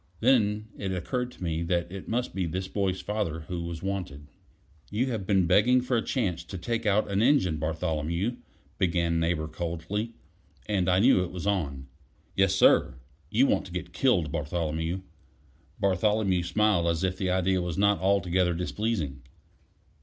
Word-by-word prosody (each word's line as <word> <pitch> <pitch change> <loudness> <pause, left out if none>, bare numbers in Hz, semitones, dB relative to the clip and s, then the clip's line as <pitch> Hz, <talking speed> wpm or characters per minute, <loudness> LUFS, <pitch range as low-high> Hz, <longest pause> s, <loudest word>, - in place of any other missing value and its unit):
Then 110 -4 +2
it 95 -2 -2
occurred 125 +7 -2
to - - -11
me 80 -1 -1
that 85 0 -1
it 95 0 -7
must 120 +2 -1
be 95 -3 -1
this 95 +3 -3
boy's 95 -1 -1
father 100 -7 -2
who 85 +2 -5
was 85 0 -6
wanted. 90 -8 -4 0.6
"You 125 +6 0
have 105 -5 -4
been 95 -3 +3
begging 125 +9 +4
for 125 0 -1
a 115 - +2
chance 95 - -1
to 95 - -7
take 115 +4 -2
out 105 0 +2
an 100 +1 +1
engine, 115 - +3
Bartholomew," 80 +7 -2 0.4
began 85 -2 +1
Neighbor 80 -1 0
coldly; 85 +8 -4 0.5
and 95 -3 +1
I 90 - +4
knew 105 -2 +5
it 90 - -5
was 90 0 -6
on. 75 -10 -1 0.5
"Yes, 95 -1 +3
sir." 65 -8 +4 0.3
"You 120 +8 +4
want - - +1
to - - -13
get 90 0 -5
killed, 90 - +2
Bartholomew." 80 +4 -2 0.8
Bartholomew 100 -1 +2
smiled 90 0 +2
as 85 +1 0
if 95 0 -1
the 95 - 0
idea 95 0 +1
was 90 -2 -3
not 100 0 +3
altogether 95 -2 +2
displeasing. 90 - -2
95 Hz, 165 wpm, -28 LUFS, 85-105 Hz, 0.8 s, knew